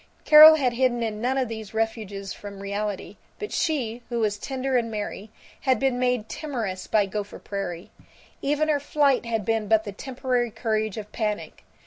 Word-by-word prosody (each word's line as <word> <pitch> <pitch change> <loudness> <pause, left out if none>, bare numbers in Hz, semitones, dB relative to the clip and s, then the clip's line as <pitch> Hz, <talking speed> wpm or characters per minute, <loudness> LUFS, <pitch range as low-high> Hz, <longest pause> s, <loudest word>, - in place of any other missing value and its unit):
Carol 310 +1 +10
had 260 -5 +1
hidden 240 -1 +1
in 215 -1 -3
none 255 +3 0
of 260 -2 +1
these 220 -2 -7
refuges 215 -3 -3
from 200 -1 -9
reality, 200 0 -4 0.2
but 420 - -6
she, 245 -8 -1
who 240 - -2
was 210 -2 0
tender 265 +1 -2
and 235 -2 +1
merry, 210 -1 -5 0.3
had 260 -3 +2
been 265 -2 +1
made 250 -3 0
timorous 225 -13 -4
by 210 -2 +3
Gopher 205 +1 -5
Prairie. 195 -3 -6 0.5
Even 295 +2 +1
her 300 -2 +2
flight 280 -4 +1
had 225 -3 -1
been 225 -1 0
but 220 +1 +3
the 205 - -6
temporary 250 +2 -2
courage 220 -2 -2
of 210 -1 -7
panic. 210 -2 -3
225 Hz, 175 wpm, -25 LUFS, 210-260 Hz, 0.5 s, Carol